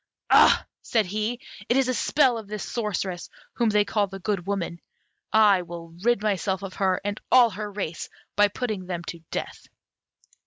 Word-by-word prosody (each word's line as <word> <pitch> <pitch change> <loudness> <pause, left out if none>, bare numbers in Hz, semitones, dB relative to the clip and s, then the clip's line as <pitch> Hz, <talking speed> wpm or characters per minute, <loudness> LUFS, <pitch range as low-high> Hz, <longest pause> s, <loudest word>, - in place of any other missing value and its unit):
"Ah!" - - +6 0.2
said 220 -3 +1
he, 215 +5 -2 0.3
"it 240 - +3
is 270 -2 +3
a 255 - +1
spell 265 0 +3
of 215 - -11
this 210 0 -5
sorceress, 195 -5 -3 0.2
whom 235 -2 +1
they 210 -1 +3
call 205 -1 +1
the 195 0 -8
Good 195 -1 -3
Woman. 175 -4 -3 0.5
I 210 -4 +5
will 170 -1 -9
rid 235 -1 +2
myself 195 -2 0
of 190 -1 -6
her 190 -2 +1
and 205 +1 -3
all 245 -3 +7
her 210 +1 -5
race 190 -5 -5 0.3
by 205 0 +5
putting 205 -3 -4
them 175 -2 -4
to 170 - -7
death!" - - -5
205 Hz, 180 wpm, -25 LUFS, 185-220 Hz, 0.5 s, all